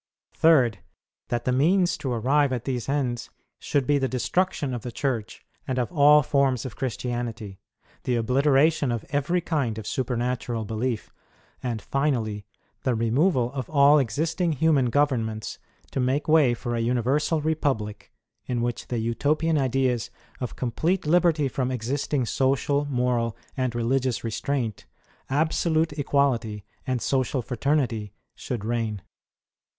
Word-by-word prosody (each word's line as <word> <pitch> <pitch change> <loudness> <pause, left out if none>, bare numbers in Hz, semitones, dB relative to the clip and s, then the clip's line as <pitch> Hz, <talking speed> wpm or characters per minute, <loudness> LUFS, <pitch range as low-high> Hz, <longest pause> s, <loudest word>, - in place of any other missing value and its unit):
3°, 135 -9 +5 0.5
That 120 0 -2
the 125 - +2
means 175 +7 +3
to 135 - -3
arrive 135 +4 +2
at 125 -3 -3
these 125 -2 -3
ends 130 -4 -1 0.3
should 140 -3 0
be 145 +1 +2
the 135 - +1
destruction 145 +2 -1
of 120 - -4
the 120 - -6
Church, 115 -3 -3 0.2
and 130 - -1
of 125 -2 -1
all 150 -2 +6
forms 135 -3 +1
of 125 - -6
Christianity; 120 -4 -4 0.5
the 125 - +1
obliteration 135 +4 +3
of 115 -3 -3
every 150 +5 +1
kind 140 -10 -1
of 110 - -6
supernatural 120 -2 -2
belief; 115 +1 -3 0.5
and, 120 -4 -3
finally, 115 -8 -1 0.3
the 130 -3 0
removal 125 +3 +2
of 130 -3 -4
all 145 0 +6
existing 160 - 0
human 145 -3 +3
governments 115 -6 0 0.3
to - - -2
make 130 +3 0
way 150 -6 +5
for 120 +1 -4
a - - -1
universal 130 +7 +1
republic 140 -9 -2 0.4
in 120 -2 -1
which 120 -1 -3
the 120 - -2
Utopian 145 +8 +1
ideas 130 -3 0 0.3
of 125 - -4
complete 160 +10 -1
liberty 165 -2 +3
from 130 -1 -2
existing 130 +2 -1
social, 140 +3 +1
moral, 125 -4 0 0.2
and 130 -3 -1
religious 125 +1 0
restraint, 115 0 -2 0.4
absolute 160 +2 +1
equality, 125 -8 0 0.2
and 130 -2 -1
social 130 -1 0
fraternity, 120 -5 -1 0.2
should 120 -6 -5
reign. 110 -4 -2
130 Hz, 135 wpm, -25 LUFS, 120-145 Hz, 0.5 s, all